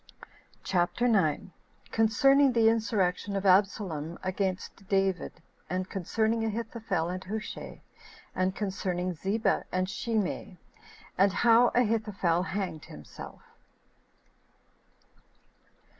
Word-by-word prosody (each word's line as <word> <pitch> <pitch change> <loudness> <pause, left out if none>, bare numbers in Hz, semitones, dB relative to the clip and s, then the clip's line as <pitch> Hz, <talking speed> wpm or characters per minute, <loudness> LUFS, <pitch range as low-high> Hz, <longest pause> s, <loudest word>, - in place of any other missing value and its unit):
CHAPTER 185 +7 +1
9. 195 -3 +1 0.4
Concerning 270 +5 +4
The 225 -1 +5
Insurrection 205 -4 0
Of 195 0 -2
Absalom 185 -4 +2
Against 190 0 -3
David 195 -2 +1 0.4
And 185 +1 -3
Concerning 220 +4 0
Ahithophel 220 -6 -2
And 185 +1 -4
Hushai; 215 +3 -6 0.5
And 185 +1 0
Concerning 185 -3 -2
Ziba 195 +7 0
And 185 0 0
Shimei; 205 -3 -2 0.6
And 195 +1 +5
How 235 +4 +5
Ahithophel 210 -7 +1
Hanged 185 -5 -4
Himself. 75 -1 -11
195 Hz, 90 wpm, -29 LUFS, 185-220 Hz, 0.6 s, The